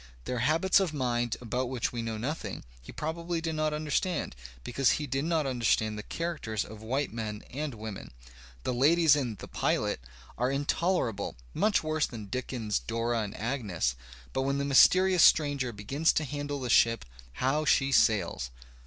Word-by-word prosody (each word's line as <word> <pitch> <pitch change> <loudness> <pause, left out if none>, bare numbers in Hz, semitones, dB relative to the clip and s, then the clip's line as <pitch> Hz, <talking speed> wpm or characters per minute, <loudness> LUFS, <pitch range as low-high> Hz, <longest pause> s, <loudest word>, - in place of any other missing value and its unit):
Their 125 - -2
habits 165 +9 +3
of 180 -6 -1
mind, 120 -3 0
about 125 +2 -2
which 125 -2 -2
we 120 - -2
know 115 -1 -3
nothing, 140 +9 -4 0.2
he - - -11
probably 170 +2 -3
did 165 0 -2
not 155 0 0
understand, 150 - -1 0.3
because 125 +1 +2
he 150 - -2
did 135 +2 -2
not 165 -3 +1
understand 115 -4 +1
the 105 - -5
characters 150 - -3
of 110 0 -11
white 130 +3 -2
men 110 -2 -4
and 145 -1 -4
women. 110 -2 -7 0.5
The 130 - -1
ladies 155 +4 +5
in 125 -6 -2
"The 90 - -10
Pilot" - - 0 0.4
are 125 +1 +2
intolerable, 145 - 0 0.2
much 210 -5 +2
worse 155 -1 0
than 110 -4 -8
Dickens's 115 -3 -2
Dora 115 - -1
and 105 -1 -5
Agnes. 105 - -1 0.4
But 130 - 0
when 140 +1 0
the 140 - -1
mysterious 185 +6 +6
stranger 145 -5 +4
begins 135 +10 +1
to 155 - +1
handle 145 0 -4
the 125 -2 -2
ship, 115 0 +4 0.3
how 135 - 0
she 140 -2 +3
sails! 95 - +2
130 Hz, 170 wpm, -29 LUFS, 115-155 Hz, 0.5 s, mysterious